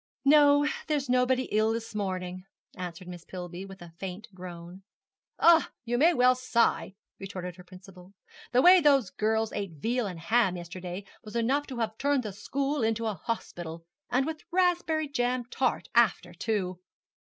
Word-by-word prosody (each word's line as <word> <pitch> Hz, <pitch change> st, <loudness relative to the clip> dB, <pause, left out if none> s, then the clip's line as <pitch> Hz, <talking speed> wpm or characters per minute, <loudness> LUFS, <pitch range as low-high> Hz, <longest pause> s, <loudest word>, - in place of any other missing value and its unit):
'No; 290 Hz, 0 st, +6 dB, 0.2 s
there's 290 Hz, -4 st, -1 dB
nobody 255 Hz, +1 st, +3 dB
ill 215 Hz, +1 st, +2 dB
this 225 Hz, -1 st, -5 dB
morning,' 185 Hz, -2 st, -4 dB, 0.3 s
answered 180 Hz, -1 st, -7 dB
Miss 175 Hz, -2 st, -8 dB
Pillby, 180 Hz, 0 st, -7 dB
with 195 Hz, -2 st, -11 dB
a 170 Hz, -1 st, -13 dB
faint 195 Hz, +4 st, -6 dB
groan. 180 Hz, 0 st, -9 dB, 0.6 s
'Ah, 335 Hz, -1 st, +5 dB, 0.2 s
you 240 Hz, +1 st, -1 dB
may 310 Hz, +8 st, +5 dB
well 250 Hz, -5 st, +5 dB
sigh,' 235 Hz, -8 st, +1 dB, 0.2 s
retorted 185 Hz, -2 st, -6 dB
her 180 Hz, -, -12 dB
principal; 185 Hz, +1 st, -15 dB, 0.4 s
'the 250 Hz, +1 st, +4 dB
way 365 Hz, +1 st, +9 dB
those 275 Hz, -, +4 dB
girls 220 Hz, +1 st, 0 dB
ate 200 Hz, -4 st, -4 dB
veal 230 Hz, -, -1 dB
and 180 Hz, -4 st, -7 dB
ham 190 Hz, +1 st, +2 dB
yesterday 180 Hz, +2 st, -7 dB, 0.2 s
was 215 Hz, +1 st, -10 dB
enough 265 Hz, +5 st, +1 dB
to 260 Hz, -, -7 dB
have 220 Hz, -1 st, -3 dB
turned 285 Hz, -2 st, +1 dB
the 210 Hz, -3 st, -5 dB
school 275 Hz, +7 st, -2 dB
into 225 Hz, 0 st, 0 dB
a 220 Hz, -, 0 dB
hospital 170 Hz, -5 st, -5 dB, 0.2 s
and 260 Hz, +2 st, +2 dB
with 315 Hz, 0 st, -5 dB
raspberry 345 Hz, -4 st, +1 dB
jam 250 Hz, -2 st, -1 dB
tart -, -, 0 dB
after, -, -, +3 dB
too.' 185 Hz, -5 st, -2 dB
220 Hz, 165 wpm, -28 LUFS, 185-260 Hz, 0.6 s, way